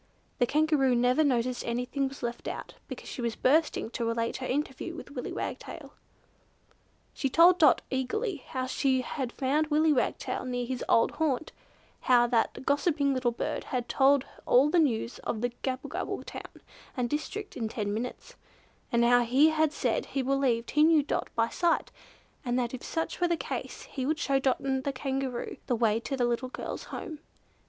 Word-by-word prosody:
The 245 - +3
Kangaroo 295 -3 +3
never 250 +5 +3
noticed 250 -3 +1
that - - -8
anything 250 +3 -1
was 270 0 -10
left 240 0 -4
out, - - -5
because - - -8
she - - -6
was 235 -1 -1
bursting 290 -4 +2
to 240 - -3
relate 230 0 -1
her 255 - -4
interview 295 +4 -3
with 305 - -9
Willy 255 -3 -5
Wagtail. - - -6 1.2
She 270 - -1
told 345 +6 +6
Dot 300 -6 +5
eagerly 330 - -1
how 260 -1 -4
she 260 0 +1
had 255 -1 -4
found 285 +5 0
Willy 305 +1 +3
Wagtail 260 - -1
near 245 -1 -2
his 255 0 -3
old 230 - +4
haunt; 315 -2 -1 0.5
how 245 -1 +4
that 240 +2 0
gossiping 285 -1 +2
little 255 -2 +1
bird 235 - -3
had 245 -2 -3
told 270 +2 +4 0.2
all 275 +4 +5
the 355 - +4
news 240 -6 0
of 220 - -3
the 245 0 0
Gabblegabble 260 0 -3
town - - -10 0.3
and 245 -1 +1
district 335 - -4
in 225 -3 -2
ten 210 -3 -2
minutes, 240 +4 -5 0.6
and 235 -1 +3
how 245 0 +5
he 260 +6 +4
had 315 -1 +2
said - - -1
he 270 - -2
believed 255 -3 +1
he 300 - +3
knew 315 -2 +5
Dot 280 - -2
by 230 0 +2
sight, 340 +6 0 0.5
and 245 -2 0
that 240 -1 -1
if 255 - -5
such 325 +2 -3
were 350 - +4
the 340 -1 +1
case - - -5
he 260 -2 -4
would 310 +1 +1
show 275 -2 +1
Dot 265 -1 +1
and 265 -1 -1
the 280 - -2
Kangaroo 265 -2 -3
the 245 - +1
way 225 -1 +2
to 270 +3 -4
the 245 - +2
little 240 +2 -1
girl's - - -6
home. 315 -6 -7
260 Hz, 185 wpm, -29 LUFS, 245-295 Hz, 1.2 s, told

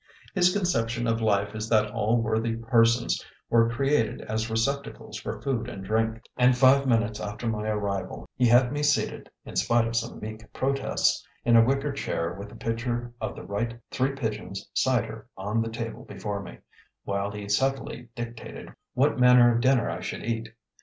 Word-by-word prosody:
His 180 -2 +4
conception 120 - 0
of 115 0 0
life 100 -2 +1
is 110 +1 -4
that 110 -2 +3
all 110 +1 +1
worthy 110 +1 0
persons 115 +1 +2 0.3
were 115 0 +5
created 135 -1 +1
as 110 +1 -2
receptacles 140 +6 -2
for - - -5
food 125 -4 -1
and 95 -5 -7
drink; 110 +2 0
and 125 0 +4
five 135 +2 +5
minutes 110 -3 +1
after 105 +3 -5
my 110 -1 -1
arrival 100 -2 -3
he 125 - +3
had 120 +1 +5
me 145 - -1
seated 145 -1 0 0.2
(in - - -9
spite 120 -1 +3
of 115 - -4
some 115 +1 -2
meek 110 0 -8
protests) 135 +1 +1 0.2
in 120 -1 +5
a 115 - +8
wicker 135 +4 +1
chair 85 -11 -2
with 100 +1 -8
a - - -12
pitcher 120 +1 -3
of - - -3
the - - -8
right 115 +3 -3
Three 135 +1 0
Pigeons 110 -6 -4
cider 115 -3 0
on 105 +4 -1
the 115 - -2
table 115 0 -5
before 100 0 -5
me, 100 - -10 0.5
while 100 0 -1
he 100 0 -7
subtly 130 +2 -1
dictated 120 -1 -7 0.2
what 135 +1 +2
manner 125 -1 +7
of 115 - +1
dinner 130 -1 +3
I - - -3
should - - -5
eat. 115 -1 -2
115 Hz, 180 wpm, -27 LUFS, 110-125 Hz, 0.5 s, a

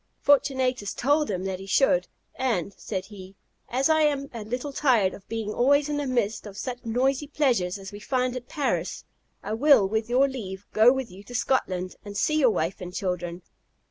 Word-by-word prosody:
Fortunatus 260 -6 +2
told 290 +2 +2
him 185 -2 -2
that 190 -1 -3
he 195 - -9
should. 185 -5 +3 0.3
"And," 220 -8 -1
said 190 -3 -5
he, 195 -1 -12 0.3
"as 260 +3 +2
I 315 -1 +4
am 285 -2 +1
a 230 -2 -5
little 250 +6 -4
tired 235 -10 +3
of 195 - -12
being 220 -2 -3
always 285 +4 +3
in 295 - -1
the 290 -1 -2
midst 220 -4 -1
of 200 -1 -10
such 245 +2 -5
noisy 260 +5 0
pleasures 240 -12 +1
as 195 -1 -9
we 205 - -9
find 255 +2 -1
at 250 0 -6
Paris, 215 - -2 0.4
I 210 - -3
will, 255 -4 +5
with 220 +3 -2
your 260 +3 +4
leave, 205 -7 -6
go 220 +3 +7
with 265 -2 -3
you 190 +2 -12
to 245 - -9
Scotland, 185 -8 -1
and 205 -1 -7
see 310 0 +2
your 260 -4 +5
wife 185 -1 -2
and 180 0 -6
children." 180 -2 -3
230 Hz, 200 wpm, -26 LUFS, 195-265 Hz, 0.4 s, go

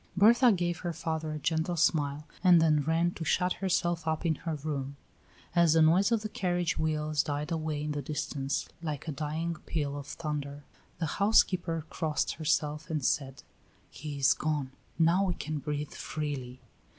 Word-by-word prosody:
Bertha 235 +5 +6
gave 175 -3 0
her 175 -1 -3
father 160 -1 -3
a 155 - -3
gentle 160 +3 0
smile 150 -2 +1 0.2
and 180 -2 +7
then 155 -2 +4
ran 165 +4 +1
to 170 - -6
shut 180 +4 +1
herself 175 -3 0
up 160 +2 -1
in 165 - +3
her 160 +1 -4
room. 140 -2 -4 0.6
As 170 -2 +5
the 160 -1 +5
noise 180 +7 +4
of 225 -2 +2
the - - -1
carriage 175 -3 0
wheels 155 -1 0
died 145 +2 -3
away 155 -2 -2
in 150 - -2
the 145 -1 -2
distance, 145 -2 -3
like 155 -2 -4
a - - -1
dying 155 +3 -3
peal 145 -3 -2
of 145 -1 -7
thunder, 145 -2 -4 0.3
the 165 - -1 0.2
housekeeper 180 -6 +3
crossed 155 -3 -1
herself, 150 0 0
and 155 -5 -1
said: 135 -2 -1 0.5
"He 145 0 -6
is 135 -1 +5
gone; 150 -4 -2 0.3
now 170 +4 +4
we 180 -3 -1
can 155 0 -4
breathe 150 0 -3
freely." 135 -5 -5
155 Hz, 175 wpm, -30 LUFS, 145-170 Hz, 0.6 s, and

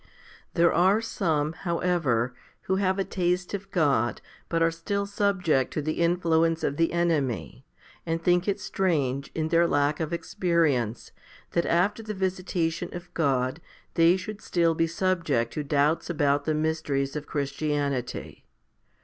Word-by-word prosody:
3. - - -29 0.6
There 170 - +5
are 190 +5 +4
some, 160 -9 -1
however, 165 -9 0 0.3
who 190 - 0
have 190 -1 +1
a 195 - +1
taste 180 0 -1
of 195 -1 -5
God, 140 - +1 0.3
but 165 -1 +2
are 165 - +3
still 200 +5 -2
subject 195 -9 +1
to 150 - -1
the 155 +1 -2
influence 165 -1 +2
of 140 - -1
the 165 0 +2
enemy, 150 -7 -1 0.4
and 165 0 -1
think 175 +2 +2
it 200 0 0
strange, 145 -10 -1
in 160 -1 -1
their 170 +1 +4
lack 145 0 +1
of 160 -1 -2
experience, 160 - 0 0.4
that 170 - 0
after 195 +6 +2
the 215 -1 -5
visitation 185 -3 -1
of 175 0 -9
God 135 -1 0 0.3
they 170 +2 +5
should 215 +2 -7
still 170 -2 +2
be 165 +1 +1
subject 165 -9 0
to 150 - -3
doubts 145 +3 +1
about 145 -3 +1
the 155 - +1
mysteries 155 -3 -1
of 150 -1 -5
Christianity. 140 -2 -3
165 Hz, 150 wpm, -26 LUFS, 145-180 Hz, 0.6 s, There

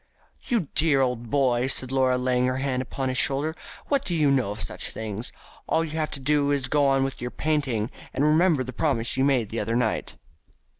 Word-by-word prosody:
"You 235 -4 +1
dear 150 -3 +3
old 125 -3 -1
boy!" 125 -2 +2
said 130 -1 +1
Laura, 130 -1 +2
laying 125 0 +1
her 130 0 -1
hand 130 -1 -1
upon 130 +1 -3
his 130 - 0
shoulder, 145 +4 +1 0.3
"what 280 -1 +1
do 175 - -2
you 150 -3 +3
know 130 -7 +2
of 105 +2 -4
such - - -5
things? 110 +1 -5 0.4
All 165 - +2
you 160 - -5
have 155 -1 -1
to 140 - -5
do 145 +1 +1
is 140 -2 +1
to 125 - -2
go 145 -2 +3
on 135 0 +3
with 135 -2 -4
your 125 - -3
painting, 135 -8 -1 0.2
and 135 - -1
to - - +4
remember 155 -2 +3
the 130 0 -7
promise 120 -5 0
you 130 - +1
made 130 -6 +2
the 115 - -3
other 115 - -1
night." 120 -3 -1
135 Hz, 230 wpm, -25 LUFS, 125-150 Hz, 0.4 s, to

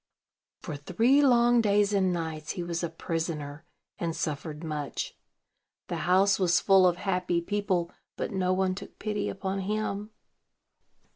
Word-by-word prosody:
For 150 - -5
three 230 - +3
long 240 -3 +5
days 205 -1 +2
and 190 -2 +2
nights 160 -3 -3
he 180 - -4
was 170 -1 -3
a 170 - -1
prisoner, 160 -3 -4 0.3
and 165 -2 -2
suffered 150 +1 -4
much. 150 -3 -4 0.7
The - - -2
house 195 +2 +4
was 180 -2 +3
full 190 -2 +5
of 175 -1 +1
happy 180 -3 0
people, 185 -2 -1 0.3
but - - -3
no 185 -1 0
one 185 0 +1
took 195 - -10
pity 210 -1 -2
upon 195 0 -3
him. 210 +1 -2
185 Hz, 145 wpm, -28 LUFS, 165-200 Hz, 0.7 s, long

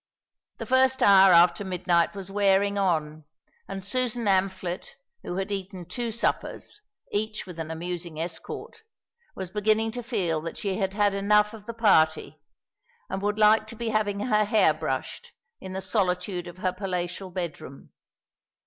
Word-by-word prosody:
The - - -6
first 260 0 +3
hour 195 -1 +7
after 175 +3 +5
midnight 180 -1 +1
was 195 -1 -7
wearing 200 0 +2
on, 155 -6 -1 0.4
and 195 -1 -6
Susan 245 +1 0
Amphlett, 190 -2 -1 0.3
who 175 - -5
had 195 +2 -3
eaten 190 -2 -5
two 230 +7 -4
suppers, 235 - -3 0.3
each 215 +1 -2
with 180 -3 -10
an 160 -1 -4
amusing 170 0 -5
escort, 165 - -6 0.5
was 190 -2 -6
beginning 215 +2 +1
to 245 +2 -5
feel 190 -10 -1
that 165 +1 -6
she 195 -2 -2
had 190 -1 -1
had 205 -1 +2
enough 210 +2 +3
of 215 -1 -12
the 230 - -6
party 160 -8 +2 0.7
and 190 0 -3
would 205 +1 -1
like 215 0 +5
to 230 - -8
be 230 0 -3
having 205 -2 0
her 215 -2 +2
hair 205 -6 +4
brushed 150 -4 -4 0.3
in 190 0 -8
the 190 - -4
solitude 180 -2 -1
of 175 - -10
her 185 -1 -1
palatial 185 0 -4
bedroom. 170 -6 -7
195 Hz, 160 wpm, -26 LUFS, 175-210 Hz, 0.7 s, hour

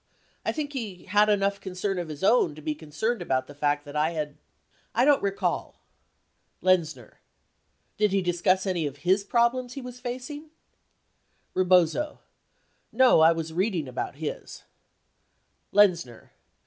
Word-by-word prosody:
I - - 0
think 295 -2 -4
he 210 -9 -6
had 210 +2 +3
enough 200 -1 +1
concern 190 0 -3
of 175 - -4
his 150 +1 -8
own 195 -8 +3
to 155 - -11
be 155 - -1
concerned 160 +9 -3
about 130 -6 0
the 145 - -12
fact 145 +1 0
that 145 +1 -10
I 155 +3 +1
had 150 -2 -4 0.6
I 245 - +4
don't 290 -1 +4
recall. 200 -1 -2 0.9
Lenzner. 160 -10 0 0.8
Did 210 -1 +2
he 195 -1 +1
discuss 180 +2 +1
any 175 -5 0
of 140 +2 -10
his 190 +3 +3
problems 240 +3 +1
he 275 - -6
w 250 0 -7
T - - -15
as - - -19
facing? 260 +5 -6 1.0
Rebozo. 185 - +2 0.7
No; 255 -8 +5
I 160 +1 +7
was 165 -1 -3
reading 180 -4 0
about 130 +2 -4
his. 150 +1 -6 1.1
Lenzner. 175 - +2
185 Hz, 150 wpm, -26 LUFS, 155-225 Hz, 1.1 s, I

